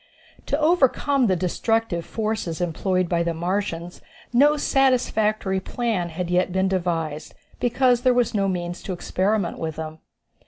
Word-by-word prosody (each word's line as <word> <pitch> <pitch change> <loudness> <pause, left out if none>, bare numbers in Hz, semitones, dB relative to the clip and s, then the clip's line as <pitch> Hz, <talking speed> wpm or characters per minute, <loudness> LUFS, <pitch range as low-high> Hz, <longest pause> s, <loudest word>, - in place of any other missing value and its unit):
To 285 - 0
overcome 285 -4 +3
the 185 - +2
destructive 185 +1 0
forces 215 -7 -3
employed 180 +1 0
by 170 -1 +1
the 170 -1 -1
Martians 175 0 -3 0.3
no 290 +5 +5
satisfactory 220 -8 +1
plan 200 -3 -2
had 175 +2 -4
yet 180 +1 +2
been 190 +1 +1
devised, 165 -5 -2 0.2
because 245 0 +2
there 255 - +4
was 245 -2 +1
no 200 -2 +1
means 175 -1 -3
to 190 - -4
experiment 190 +1 -1
with 160 -1 -3
them. 160 0 -6
190 Hz, 145 wpm, -23 LUFS, 175-235 Hz, 0.3 s, no